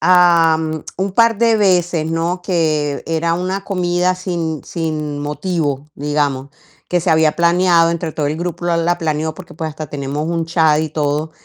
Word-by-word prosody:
am, 165 -3 +4
un 190 +1 -2
par 230 0 +3
de 230 -1 +4
veces, 175 -5 +1
¿no? 170 +2 -1
Que 155 -5 0
era 165 +1 0
una 185 +3 -2
comida 180 -1 0
sin 170 -4 -3
sin 155 -3 -3
motivo, 150 -2 -2
digamos, 145 -2 -1 0.4
que 180 - +1
se 175 - -3
había 160 -1 +3
planeado, 170 0 +4
entre 170 -1 -2
todo 150 -2 -2
el 150 - -2
grupo 175 0 -4
la 170 -1 +1
la 175 +1 +1
planeó, 155 -1 -1
porque, 175 +2 -12
pues, 160 0 -4
hasta 155 0 -7
tenemos 145 +2 -3
un 165 -1 -1
chat 160 -2 +3
y 155 - -2
todo. 150 +1 -1
165 Hz, 175 wpm, -18 LUFS, 155-175 Hz, 0.4 s, am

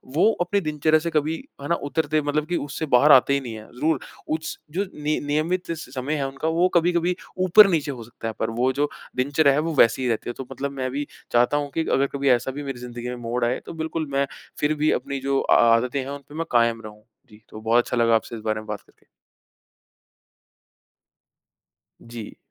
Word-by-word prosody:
वो 195 +7 +5
अपने 200 +3 +1
दिनचर्या 155 -1 +2
से 170 +2 -3
कभी 155 +1 +1 0.3
है 140 - -5
ना 170 - +2
उतरते, 155 0 -1
मतलब 145 +1 -1
कि 175 - -1
उससे 150 +2 -4
बाहर 145 +5 +6
आते 135 +1 +6
ही 140 - +2
नहीं 125 -4 -7
हैं। 110 0 -10
जरूर। 150 +4 0 0.3
उस 155 0 -3
जो 190 +6 -1
निय 150 +1 -1
नियमित 160 +5 -1
समय 140 -3 -4
है 140 -2 -1
उनका, 140 +3 -4
वो 170 +3 +3
कभी-कभी 175 +1 +2 0.3
ऊपर 200 +3 +8
नीचे 155 -5 0
हो 125 -4 -7
सकता 115 0 -8
है, 110 - -3
पर 110 - 0
वो 120 +3 +1
जो 145 +2 0 0.3
दिनचर्या 140 +2 +3
है 140 - +2
वो 165 +1 -1
वैसी 115 -1 +4
ही 130 - 0
रहती 115 +1 -2
है, - - -3
तो 135 - -7
मतलब 140 +1 -4
मैं 130 -2 -3
भी 145 +2 -3 0.2
चाहता 120 +4 +3
हूँ 145 -1 -2
कि 160 - -1
अगर 140 +1 +3
कभी 140 0 -1
ऐसा 125 +1 +2
भी 145 +2 -6
मेरी 135 -3 -5
ज़िंदगी 120 0 -7
में 125 - -4
मोड़ 120 +1 -1
आए, 120 +2 0
तो - - -7
बिल्कुल 160 -1 -3
मैं 140 0 +2 0.3
फिर 150 +1 +2
भी 150 +1 +2
अपनी 140 0 -2
जो 135 0 0
आ - - +3 0.2
आदतें 125 +4 0
हैं, 130 - -4
उन 140 0 -6
पे 145 - -11
मैं 165 +1 -2
कायम 115 -1 +3
रहूँ। 105 -1 -11 0.3
जी, 105 0 -17
तो 110 - -10
बहुत 115 +2 +3
अच्छा 125 - -3
लगा 115 -1 +4
आपसे 115 +1 -2
इस 110 - -8
बारे 110 -1 0
में 110 - -14
बात 105 -1 -4
करके। - - -29 3.0
जी। 115 -2 -9
140 Hz, 225 wpm, -24 LUFS, 120-155 Hz, 3.0 s, ऊपर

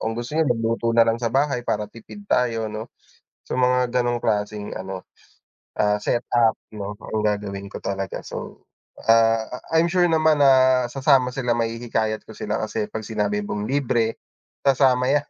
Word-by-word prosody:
kung 110 - -2
gusto 120 +5 -5
niyo 160 -3 +2
mag-luto 115 0 -1
nalang 115 0 +4
sa 115 -2 -1
bahay 135 -2 +1
para 105 0 -1
tipid 115 - -12
tayo 115 -3 +1
no. 110 +1 -6 0.6
So - - -2
mga 125 -1 +2
ganong 120 -1 +1
klaseng 105 -1 -1
ano, 95 0 -6 0.7
ah, 105 0 +3
set-up 120 0 +1 0.2
'no, 105 0 -5
ang 110 - -3
gagawin 100 -1 -3
ko - - -5
talaga 95 -1 -3
so, - - -8 0.4
ah, 115 0 +5 0.3
I 160 0 +5
I'm - - +1
sure 180 -1 +4
naman 160 -2 +3
na 130 -2 +5
sasama 135 -1 +3
sila, 125 -3 0
mahihikayat 115 -1 -2
ko - - -12
sila, 105 - -3
kasi 105 0 -3
pag 110 - -6
sinabi 105 -2 -1
mong 105 +1 -4
libre, 120 -5 0 0.5
sasama 130 -2 +3
yan. 145 0 +1
115 Hz, 165 wpm, -23 LUFS, 105-130 Hz, 0.7 s, ah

